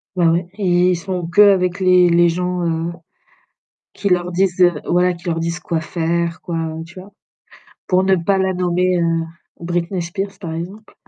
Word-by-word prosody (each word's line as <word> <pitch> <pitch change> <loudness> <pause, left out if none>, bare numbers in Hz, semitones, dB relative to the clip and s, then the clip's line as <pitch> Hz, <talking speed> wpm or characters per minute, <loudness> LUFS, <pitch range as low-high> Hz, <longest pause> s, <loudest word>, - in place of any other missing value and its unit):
Bah, 170 -2 +3
ouais, 170 +1 0
et 180 -2 +2
ils - - +1
sont 175 0 -4
qu'avec 185 -1 +4
les 180 -1 +5
les 170 0 +4
gens, 180 +1 -2
heu, 165 +1 -2 1.0
qui 200 - -2
leur 180 -1 0
disent, 185 0 0
heu 175 -1 +6 0.2
voilà, 180 +1 +2
leur 165 -2 -1
disent 170 +1 -3
quoi 170 -2 -2
faire, 170 0 -2
quoi, 170 - -5 0.3
tu 175 +3 -13
vois? 195 +2 -14 0.7
Pour 185 0 +2
ne 190 0 +3
pas 190 +3 +1
la 190 0 0
nommer 180 0 +1
heu, 165 -1 0 0.4
Britney 175 +2 -2
Spears, 195 +3 -5
par 165 -4 -5
exemple. 190 +6 -8
175 Hz, 175 wpm, -19 LUFS, 170-185 Hz, 1.0 s, heu